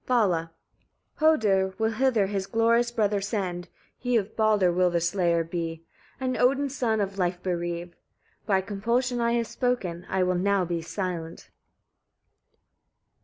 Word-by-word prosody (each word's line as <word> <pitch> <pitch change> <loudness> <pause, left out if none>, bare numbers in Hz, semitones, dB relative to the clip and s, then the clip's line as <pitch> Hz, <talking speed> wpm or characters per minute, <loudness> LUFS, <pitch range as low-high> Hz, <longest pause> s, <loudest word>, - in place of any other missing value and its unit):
Vala. 185 -10 +2 0.7
14. 315 +1 +5
"Hödr 190 -2 +1
will 220 0 +1
hither 235 -3 +2
his 195 -1 -3
glorious 230 +3 +2
brother 210 -4 0
send, 190 -4 -3 0.3
he 245 -1 +1
of 210 0 -3
Baldr 210 -5 +3
will 180 0 +3
the 170 -1 +1
slayer 170 -1 +1
be, 165 -1 -5 0.3
and 255 -1 -1
Odin's 275 +2 +2
son 225 -5 0
of 200 -1 -2
life 180 0 -1
bereave. 175 -1 -3 0.5
By 195 -3 +3
compulsion 235 +5 -1
I 235 0 +2
have 235 -1 +1
spoken; 215 -9 -2
I 190 -1 +1
will 180 0 +1
now 190 +1 +1
be 170 -1 -2
silent." 170 -2 -5
195 Hz, 145 wpm, -26 LUFS, 175-235 Hz, 0.7 s, 14